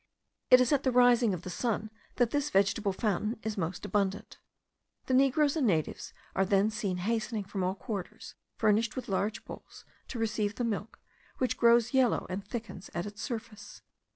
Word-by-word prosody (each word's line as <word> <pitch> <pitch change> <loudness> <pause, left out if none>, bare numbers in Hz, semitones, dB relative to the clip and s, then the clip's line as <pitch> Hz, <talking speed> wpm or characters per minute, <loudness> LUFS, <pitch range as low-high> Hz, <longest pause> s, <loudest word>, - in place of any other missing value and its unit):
It 255 - +9
is 255 +1 +3
at 280 - +3
the 260 - +1
rising 245 -2 +5
of 180 -2 -4
the 180 - -6
sun 220 +2 -2 0.2
that 245 -2 +2
this 290 0 0
vegetable 200 0 +2
fountain 210 +3 -1
is 220 -1 -3
most 175 -2 -3
abundant. 200 -1 -2 0.7
The 260 - -1
negroes 275 +3 +3
and 290 -6 +2
natives 160 -6 -1 0.2
are 195 - +3
then 195 +2 +2
seen 205 -4 -2
hastening 220 +2 -1
from 195 0 -4
all 185 +1 0
quarters, 215 +4 -6 0.2
furnished 220 +1 +2
with 255 -2 -5
large 205 +3 -2
bowls - - -11 0.2
to 250 - -6
receive 215 -2 -1
the 245 - -2
milk, 225 -1 -3 0.4
which 255 - 0
grows 235 +1 +4
yellow, 260 -3 +3
and 190 +2 -3
thickens 215 -3 -7
at 170 - -2
its 205 +1 -8
surface. 220 -4 -7
220 Hz, 180 wpm, -30 LUFS, 200-240 Hz, 0.7 s, It